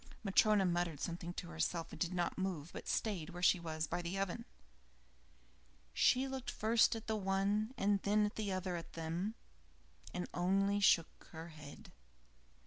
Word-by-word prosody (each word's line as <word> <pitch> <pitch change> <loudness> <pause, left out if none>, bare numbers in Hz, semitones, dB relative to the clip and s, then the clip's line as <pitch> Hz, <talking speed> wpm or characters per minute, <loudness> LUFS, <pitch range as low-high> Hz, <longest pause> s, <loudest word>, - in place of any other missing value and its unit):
Matryona 205 0 +4
muttered 175 -4 0
something 170 +1 -4
to 85 - -6
herself 80 - -2
and - - -9
did 175 - 0
not 175 -1 -1
move, 180 -5 -3
but - - -7
stayed 190 -8 -1
where 175 +1 -7
she 180 - +5
was, 160 -1 -2
by 175 - -2
the 175 +3 -3
oven. 195 +4 -2 1.5
She 260 - +4
looked 265 -1 -4
first 225 +2 +3
at 225 0 -6
the 220 - -1
one 200 +4 0
and 200 -2 +2
then 210 +1 +3
at 210 - -3
the 210 -2 -2
other 185 -1 -2
of 165 - -8
them, 170 +6 -3 0.8
and 180 - -3
only 195 +3 +2
shook 170 -5 +3
her 165 +1 -7
head. 150 -3 -11
185 Hz, 165 wpm, -36 LUFS, 170-205 Hz, 1.5 s, she